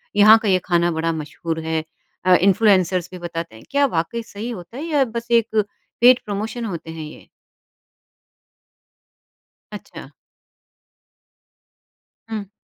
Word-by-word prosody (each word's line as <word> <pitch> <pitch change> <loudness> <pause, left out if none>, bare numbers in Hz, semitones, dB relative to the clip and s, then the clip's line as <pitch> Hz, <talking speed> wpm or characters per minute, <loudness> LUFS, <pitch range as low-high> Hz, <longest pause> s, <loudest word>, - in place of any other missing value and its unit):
यहाँ 215 +2 +8
का 220 - -3
ये 185 -1 +3
ख़ाना 175 -1 +2
बड़ा 165 0 -1
मशहूर 160 +1 -5
है 160 -1 -1 0.4
अ, 185 0 +6
इन्फ्लुएंसर्स 185 -2 +3
भी 185 - -8
बताते 170 -5 -6
हैं, 110 - -14
क्या 280 0 +3
वाक़ई 230 +2 -2
सही 220 +2 -7
होता 210 +1 -8
है 295 - -5
या 295 -4 +2
बस 235 0 -6
एक 220 -2 +2 0.4
पेड 250 +1 +7
प्रमोशन 220 +3 -4
होते 170 -6 -6
हैं 160 -1 -7
ये? 150 - -12 2.4
अच्छा। - - -10 2.2
हुँ। 210 -3 -5
195 Hz, 130 wpm, -21 LUFS, 165-225 Hz, 2.4 s, यहाँ